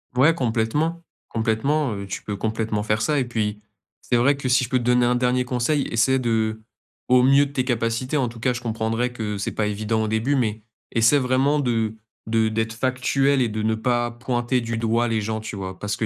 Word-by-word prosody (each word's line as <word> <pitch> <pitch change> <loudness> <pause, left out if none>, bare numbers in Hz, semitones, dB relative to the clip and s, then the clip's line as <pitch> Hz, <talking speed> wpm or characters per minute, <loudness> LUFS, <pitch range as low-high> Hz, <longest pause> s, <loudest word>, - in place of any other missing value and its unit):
Ouais, 140 +6 +5
complètement 145 +7 -1 0.3
complètement. 115 +5 0
Heu, 100 0 -6
tu 95 - -5
peux 105 - -4
complètement 110 0 -2
faire 105 0 0
ça 150 +2 +1
et 130 - 0
puis 105 -3 -2 0.4
c'est 120 - +1
vrai 140 +4 +3
que 135 - -4
si 125 0 +3
je 120 - -4
peux 130 - +2
te 125 - -2
donner 125 0 +3
un 125 - +2
dernier 125 +1 +1
conseil, 130 +4 0
essaie 130 +3 +2
de- 110 -2 0 0.5
au 125 0 +5
mieux 140 +2 +5
de - - -13
tes 130 -3 -1
capacités 120 +2 -1
en 130 -4 +1
tout 115 0 -11
cas, 125 +2 +1
je 120 - -5
comprendrais 115 +1 -1
que 105 -4 -4
c'est - - -2
pas 110 - 0
évident 110 +2 -1
au - - -1
début- 110 +6 0
mais 110 -4 -1 0.3
essaie 115 +5 +4
vraiment 135 +3 +2
de 115 -5 0 0.3
de 110 0 +2
d'être 110 0 -1
factuelle 130 +3 +1
et 120 - +1
de 110 0 -3
ne 110 +1 +1
pas 120 +1 0
pointer 120 +1 -1
du 115 0 -3
doigt 115 +1 +1
les 115 -1 0
gens 110 +1 -3
tu 110 - -6
vois? 95 -1 -6
Parce 105 0 -2
que 110 - -2
120 Hz, 225 wpm, -23 LUFS, 110-130 Hz, 0.5 s, Ouais